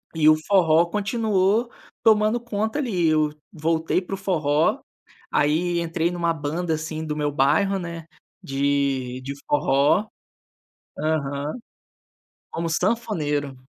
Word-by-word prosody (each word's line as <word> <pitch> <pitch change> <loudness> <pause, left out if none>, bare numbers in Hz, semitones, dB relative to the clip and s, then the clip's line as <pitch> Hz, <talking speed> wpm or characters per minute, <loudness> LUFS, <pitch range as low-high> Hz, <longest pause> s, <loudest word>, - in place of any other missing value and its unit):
e 155 -1 +3
o 155 - +8
forró 170 -4 +4
continuou 210 +2 +1 0.3
tomando 215 +1 +4
conta 220 +3 -2
ali. 185 - 0
Eu 155 -1 +2 0.2
voltei 160 +3 0
para 195 +2 -5
o - - -8
forró, 155 -6 +1 0.5
aí 170 +4 +1
entrei 165 0 -1
em 175 - -5
uma 170 -1 +1
banda, 160 +2 -2
assim, 155 0 -4
do 150 -1 -3
meu 150 -1 -1
bairro, 195 +9 +2
né, 170 -2 -6 0.4
de 135 -2 -1
de 140 +2 -5
forró. 145 +8 +2 0.9
Aham, 145 -2 -1 1.0
como 165 0 -3
sanfoneiro, 155 - -1
165 Hz, 125 wpm, -23 LUFS, 145-195 Hz, 1.0 s, o